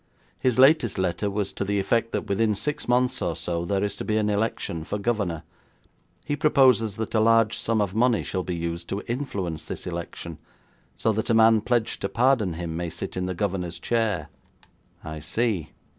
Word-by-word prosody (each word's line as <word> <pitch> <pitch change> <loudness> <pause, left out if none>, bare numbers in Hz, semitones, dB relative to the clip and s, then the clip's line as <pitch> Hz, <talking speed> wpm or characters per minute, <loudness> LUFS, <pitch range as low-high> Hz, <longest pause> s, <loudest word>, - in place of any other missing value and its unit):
His 125 -2 +1
latest 135 -4 +5
letter 95 +2 0
was 100 -1 -2
to - - -2
the 100 +1 0
effect 115 +3 +1
that 105 - -2
within 105 +2 +1
six 150 +8 -3
months 125 +1 +2
or 85 - -1
so 85 0 -3
there 100 +2 0
is 100 -1 -1
to - - -4
be 110 -1 0
an 105 -1 +1
election 100 -6 -1
for 105 - -3
governor. 100 -7 -1 0.8
He 145 - -1
proposes 130 -8 +4
that 110 +1 -4
a 110 - +3
large 115 0 +4
sum 115 -1 0
of 100 -2 -1
money 120 +1 +2
shall 95 - -2
be 90 -1 -3
used 85 0 -4
to 100 - -3
influence 95 - -3
this - - -6
election 85 -2 -6 0.6
so 110 - +1
that 110 +3 -2
a 115 - +4
man 110 -1 +6
pledged 120 0 0
to 100 - -1
pardon 115 -4 +2
him 85 -1 -4
may 85 0 -3
sit - - -6
in 90 0 -2
the 95 - -3
governor's 90 -3 -2
chair.' 105 -10 -1 0.7
'I 80 0 -6
see. 95 +1 -1
105 Hz, 195 wpm, -25 LUFS, 90-115 Hz, 0.8 s, man